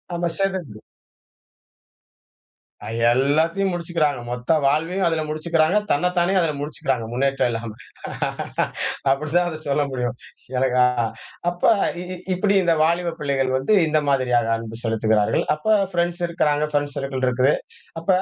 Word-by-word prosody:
ஆமா 175 0 0
செதுருது. 185 - -2 2.0
அ - - -7 0.2
எல்லாத்தையும் 160 +9 +2
முடிச்சுக்கிறாங்க. 165 -5 0
மொத்த 125 +4 -2
வாழ்வையும் 165 +7 +1
அதில 165 -1 0
முடிச்சுக்கிறாங்க. 160 +3 +1
தன்னைத்தானே 180 +3 +1
அதில 165 -2 +1
முடிச்சுக்கிறாங்க, 135 -5 -2
முன்னேற்றம் 135 0 +1
இல்லாம. 115 -1 -4 1.4
அப்படிதான் 155 +5 +1
அதை 155 - -6
சொல்ல 145 +1 +2
முடியும். 125 -1 -2 0.4
எனக்கா 125 -1 +3 0.7
அப்ப 175 0 -9 0.4
இ - - -5
இ - - -5 0.2
இப்படி 195 +2 +1
இந்த 170 -1 +3
வாலிப 170 +1 +1
பிள்ளைகள் 135 -3 0
வந்து 135 +11 +1
இந்த 155 0 +2
மாதிரியாக 125 -4 +2
அன்பு 115 0 -8
செலுத்துகிறார்கள். 110 -2 +1
அப்ப 150 - -19 0.3
ஃப்ரெண்ட்ஸ் 175 0 -1
இருக்கிறாங்க, 150 -3 +1
ஃப்ரெண்ட்ஸ் 145 -1 -1
சர்க்கிள் 135 -1 -2
இருக்குது. 125 +3 +3 0.5
அப்ப 165 - -18
150 Hz, 125 wpm, -22 LUFS, 130-170 Hz, 2.0 s, எனக்கா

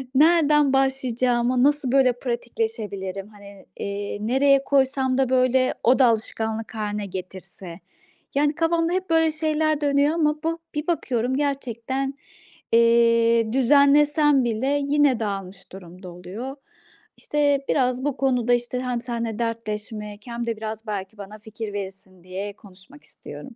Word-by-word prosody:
Nereden 300 -2 +4
başlayacağımı, 255 -2 +1
nasıl 285 -2 +2
böyle 265 -2 +4
pratikleşebilirim? 220 -5 -4
Hani, 200 -2 -15
eee, 200 +1 -4
nereye 270 +4 +3
koysam 265 -1 +1
da 265 -2 +1
böyle 255 0 +2
o 255 +4 +4
da 260 - +6
alışkanlık 220 0 -2
hâline 210 -1 -3
getirse? 185 -1 -9 0.6
Yani 290 +1 +2
kafamda 330 0 +1
hep 370 0 -2
böyle 325 -1 +3
şeyler 310 -1 0
dönüyor 285 +1 +2
ama 300 -2 +1
bu 330 +1 -1 0.2
bir 300 +1 -3
bakıyorum 260 -7 -1
gerçekten, 270 -1 -2 0.6
eee, 230 -1 +4
düzenlesem 285 +2 +4
bile 260 +6 0
yine 285 -4 +3
dağılmış 195 -3 -5
durumda 185 0 -11
oluyor. 185 +10 -7 0.6
İşte, 290 -1 +1
biraz 255 -1 +1
bu 285 -2 -1
konuda, 250 -3 +1
işte, 240 +1 -1
hem 250 -2 -2
seninle 235 -2 -4
dertleşmek 215 -2 -5
hem 235 0 -4
de 230 -2 -3
biraz 220 +1 -6
belki 205 0 -5
bana 205 +1 -10
fikir 220 -1 -7
verirsin 190 -2 -8
diye 190 +3 -6
konuşmak 200 +9 -18
istiyorum. 265 -3 -12
240 Hz, 130 wpm, -23 LUFS, 215-280 Hz, 0.6 s, da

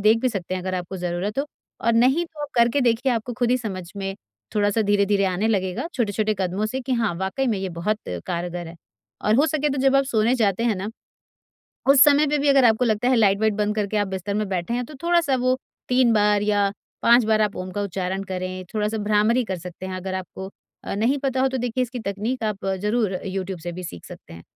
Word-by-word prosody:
देख 215 +3 +5
भी 255 - +2
सकते 185 -5 -4
हैं 185 - -3
अगर 185 0 -3
आपको 180 +1 -4
ज़रूरत 180 +5 -3
हो 275 - +1 0.4
और 235 - +4
नहीं 260 +9 +3
तो 320 -2 -13
आप 290 - -4
करके 235 +3 +3
देखिए 245 +1 +2
आपको 230 +1 -2
खुद 245 -1 +2
ही 250 - +4
समझ 200 -6 -5
में 195 -1 -3 0.4
थोड़ा-सा 205 +1 +2
धीरे-धीरे 200 -1 +2
आने 190 +4 0
लगेगा, 190 - -1
छोटे-छोटे 215 -2 0
कदमों 190 +3 -1
से 260 +5 -3
कि 260 +1 -3
हाँ 230 -7 +1
वाक़ई 190 +9 -2
में 220 -5 0
ये 190 0 -3
बहुत 215 +4 0 0.3
कारगर 175 0 -3
है। 165 - -11 0.5
और 210 - +3
हो 290 - +4
सके 305 -2 0
तो 275 - -2
जब 270 0 +4
आप 275 - +3
सोने 230 -2 +2
जाते 220 -3 +1
हैं 230 -3 +2
ना, 190 +3 -4 1.0
उस 275 -1 +8
समय 295 +1 +5
पे 295 +1 +1
भी 285 0 +1
अगर 275 -2 +5
आपको 225 +1 +4
लगता 220 +1 +1
है 255 - +4
लाइट-वाइट 215 0 +3
बंद 210 0 0
करके 210 0 -1
आप 205 -1 +1
बिस्तर 190 +1 -4
में 210 -1 -1
बैठे 185 +4 -2
हैं 245 - -1
तो 300 - -12
थोड़ा-सा 340 -6 +2
वो 255 +1 +1 0.3
3 250 -2 +4
बार 210 -1 +3
या 205 -1 +2 0.3
5 235 0 +6
बार 220 0 +2
आप 210 -1 -1
ओम 185 0 -5
का 205 - -2
उच्चारण 190 0 -3
करें, 185 0 -4
थोड़ा-सा 215 +1 0
भ्रामरी 215 +4 +2
कर 190 -4 -4
सकते 180 +2 -8
हैं। 185 - -4
अगर 185 +1 -4
आपको 190 +1 -6 0.3
अ, - - -3
नहीं 230 +7 +2
पता 265 -1 -1
हो 265 - +3
तो 260 - -3
देखिए 245 +1 -1
इसकी 250 0 -4
तकनीक 220 +5 -3
आप 205 -3 -3 0.2
ज़रूर 210 -1 +1
अ, 180 - -3
यूट्यूब 190 -1 -4
से 175 +1 -5
भी 185 - -7
सीख 85 - -8
सकते - - -12
हैं। 85 - -11
210 Hz, 235 wpm, -23 LUFS, 190-245 Hz, 1.0 s, उस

